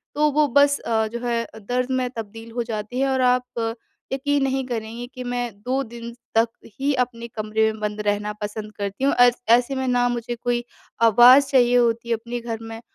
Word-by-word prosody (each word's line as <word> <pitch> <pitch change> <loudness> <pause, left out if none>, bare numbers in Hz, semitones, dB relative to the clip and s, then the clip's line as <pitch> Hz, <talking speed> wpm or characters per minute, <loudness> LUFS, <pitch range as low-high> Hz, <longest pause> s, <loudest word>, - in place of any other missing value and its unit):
तो 300 0 +3
वो 300 +1 +3
बस 285 +2 +4
अ, 220 -1 0
जो 235 +2 -6
है 235 -1 0 0.2
दर्द 250 +4 -2
में 255 -1 0
तब्दील 225 +1 -8
हो 240 0 -2
जाती 225 +2 -4
है। 275 - +2
और 260 -1 +1
आप 250 -2 0 0.4
यक़ीन 285 +1 0
नहीं 265 -1 0
करेंगी 230 0 -5
कि 250 - -6
मैं 245 -1 -2
2 260 +4 -1
दिन 235 0 -9 0.2
तक 225 +1 +4 0.3
ही 280 +1 +1
अपने 235 -1 -8
कमरे 220 0 0
में 215 - -10
बंद 210 0 -2
रहना 210 +1 0
पसंद 210 +1 -5
करती 200 +5 -4
हूँ। 280 - +3
ऐस 245 0 +5
ऐसे 245 +3 +4
में 265 0 -2
ना 245 -1 +2
मुझे 240 0 -3
कोई 240 0 -1 0.4
आवाज़ 245 +5 +7
चाहिए 245 -2 +4
होती 235 0 +1
है 230 - +3
अपने 235 +2 -5
घर 230 -1 -5
में, 225 0 -8
240 Hz, 205 wpm, -23 LUFS, 225-250 Hz, 0.4 s, आवाज़